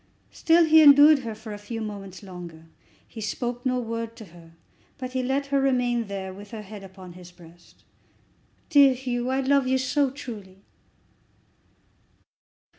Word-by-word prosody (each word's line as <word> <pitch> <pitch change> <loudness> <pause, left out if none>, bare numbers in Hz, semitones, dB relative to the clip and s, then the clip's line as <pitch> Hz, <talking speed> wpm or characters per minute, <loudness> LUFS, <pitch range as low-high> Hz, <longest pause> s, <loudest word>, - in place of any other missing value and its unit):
Still 335 +1 +3
he 315 0 +6
endured 290 0 +8
her 230 -4 -6
for 220 0 -9
a 205 - -8
few 225 +2 -7
moments 200 -4 -8
longer. 175 -4 -10 0.4
He 225 - -10
spoke 240 +3 -4
no 255 -1 0
word 230 -1 -5
to 220 - -11
her, 165 -1 -16 0.4
but 255 -2 -7
he 260 - -1
let 270 +2 -1
her 275 - +3
remain 245 -4 0
there, 190 -1 -6
with 200 +2 -12
her 220 -1 -8
head 205 0 -11
upon 190 -2 -12
his 180 0 -13
breast. 175 -1 -19 0.9
"Dear 280 -4 +6
Hugh, 250 -1 -3
I 265 +1 0
love 275 0 +2
you 260 0 +2
so 270 +2 0
truly!" 210 -8 -10
230 Hz, 160 wpm, -25 LUFS, 195-265 Hz, 0.9 s, endured